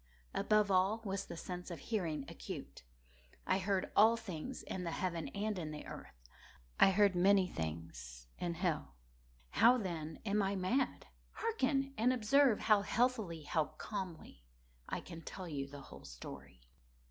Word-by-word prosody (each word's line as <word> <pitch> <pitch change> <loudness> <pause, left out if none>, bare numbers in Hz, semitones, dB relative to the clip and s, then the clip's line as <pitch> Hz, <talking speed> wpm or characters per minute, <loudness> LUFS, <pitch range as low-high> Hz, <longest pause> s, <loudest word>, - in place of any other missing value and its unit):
Above 210 -2 +3
all 190 +4 +3
was 195 -1 -2
the - - -7
sense 180 +1 -6
of 170 - -5
hearing 165 -11 -2
acute. - - -7 0.6
I 185 - +2
heard 195 -1 0
all 225 +3 +7
things 225 +3 -6
in 185 - -4
the 170 - -2
heaven 170 -3 -2
and 210 -1 -2
in 160 -3 -4
the 150 -1 -7
earth. - - -10 0.5
I - - +8
heard 200 0 +4
many 190 +2 +5
things 80 - -6
in 170 -1 -2
hell. 165 - -1 0.6
How, 240 +3 +6
then, 165 -7 -4
am 205 0 +2
I 195 0 +1
mad? 220 +9 0 0.3
Hearken! 275 -11 0
and 240 +3 +4
observe 255 +1 +4
how 210 -2 +5
healthily—how 185 - +1
calmly 180 - -6 0.5
I - - -2
can 170 -2 -9
tell 185 +3 -7
you 140 -4 -3
the 140 0 -9
whole - - -12
story. - - -10
185 Hz, 150 wpm, -36 LUFS, 160-215 Hz, 0.6 s, I